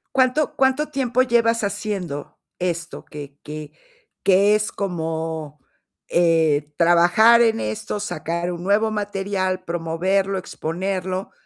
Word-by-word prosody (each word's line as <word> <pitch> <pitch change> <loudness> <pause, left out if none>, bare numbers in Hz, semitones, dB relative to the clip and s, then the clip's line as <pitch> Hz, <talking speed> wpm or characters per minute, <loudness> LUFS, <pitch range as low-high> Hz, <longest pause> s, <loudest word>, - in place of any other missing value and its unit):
¿Cuánto 260 +3 +2
cuánto 265 +3 +2
tiempo 255 -3 +1
llevas 230 -2 +2
haciendo 200 -8 -4 0.2
esto? 175 -1 -3
Que 145 -2 -10
que 150 0 -7 0.5
que 200 +2 +5
es 210 0 -1
como, 160 -5 -4 0.5
eh, 160 -4 +2
trabajar 175 +8 +5
en 225 -1 +3
esto, 110 - -3
sacar 170 -2 -3
un 175 0 -6
nuevo 215 +3 +2
material, 195 -3 -2
promoverlo, 185 +4 -1
exponerlo 185 +2 -3
185 Hz, 110 wpm, -22 LUFS, 165-210 Hz, 0.5 s, que